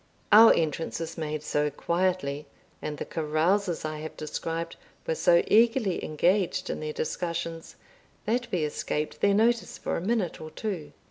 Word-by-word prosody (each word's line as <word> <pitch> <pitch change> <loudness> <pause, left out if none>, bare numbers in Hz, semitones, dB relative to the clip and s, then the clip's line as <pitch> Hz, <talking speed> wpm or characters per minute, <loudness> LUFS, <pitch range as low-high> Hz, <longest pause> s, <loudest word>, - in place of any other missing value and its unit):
Our 225 +2 +10
entrance 160 0 -1
was 165 0 -5
made 155 -2 -4
so 150 0 0
quietly, 170 -2 -1 0.3
and 150 -1 -4
the - - -4
carousers 165 +4 0
I 155 0 -4
have 155 +1 -7
described 165 +2 -4 0.3
were - - 0
so 170 +1 +4
eagerly 225 -3 +3
engaged 180 +5 +1
in - - -4
their 155 0 -3
discussions, 165 +1 -4 0.5
that 240 +2 -1
we 175 -4 0
escaped 150 0 -3
their 200 0 +4
notice 230 +2 +2
for - - -3
a - - -3
minute 200 -2 -1
or 155 - -7
two. 165 -6 -5
165 Hz, 155 wpm, -27 LUFS, 155-200 Hz, 0.5 s, Our